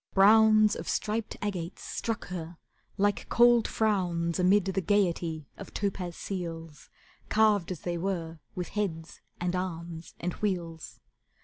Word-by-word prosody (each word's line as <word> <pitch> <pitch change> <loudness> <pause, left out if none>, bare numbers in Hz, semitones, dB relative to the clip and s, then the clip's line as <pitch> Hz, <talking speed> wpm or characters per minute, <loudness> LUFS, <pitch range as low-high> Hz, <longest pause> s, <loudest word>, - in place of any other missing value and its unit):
Browns 215 +1 +6
Of - - -5
striped 220 +1 -2
agates 185 -4 -4
struck 225 -5 -3
her 170 -2 -6 0.4
like 205 0 +1
cold 240 -1 +5
frowns 180 -6 0
Amid 185 +2 +4
the 190 0 0
gaiety 170 -5 +1
of - - -10
topaz 185 -4 -2
seals, 165 -5 -6 0.4
Carved 210 -4 +3
though 185 - -2
they 175 -1 -2
were 165 -3 -3 0.2
with 180 -1 -4
heads, 170 -6 -3 0.2
and 180 +1 -1
arms, 170 -2 -5
and 175 +1 -2
wheels. 170 -6 -3
185 Hz, 130 wpm, -29 LUFS, 170-205 Hz, 0.4 s, Browns